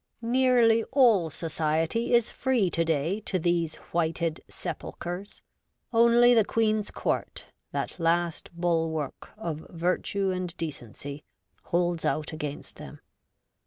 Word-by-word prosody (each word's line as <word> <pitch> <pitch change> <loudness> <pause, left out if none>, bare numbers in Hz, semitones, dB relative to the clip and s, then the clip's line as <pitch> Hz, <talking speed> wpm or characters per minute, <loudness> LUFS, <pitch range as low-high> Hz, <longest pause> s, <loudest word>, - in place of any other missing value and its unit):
Nearly 240 -2 +4
all 230 - +4
Society 160 +7 -1
is 235 -2 +2
free 240 -9 +1
to 165 - +2
day 165 +4 0
to 190 - 0
these 170 -2 0 0.2
whited 165 -1 0
sepulchres; 180 +4 -6 0.5
only 235 +1 +6
the 225 -2 +5
Queen's 215 -1 +1
Court - - -3
— - - -52
that - - -3
last 170 0 0
bulwark 165 -4 -1
of 165 -7 -5
virtue 180 +3 0
and 180 -1 -4
decency 145 -1 -6 0.2
— - - -41
holds 175 -1 0
out 155 +1 -1
against 150 -2 -6
them. - - -10
175 Hz, 125 wpm, -27 LUFS, 160-220 Hz, 0.5 s, only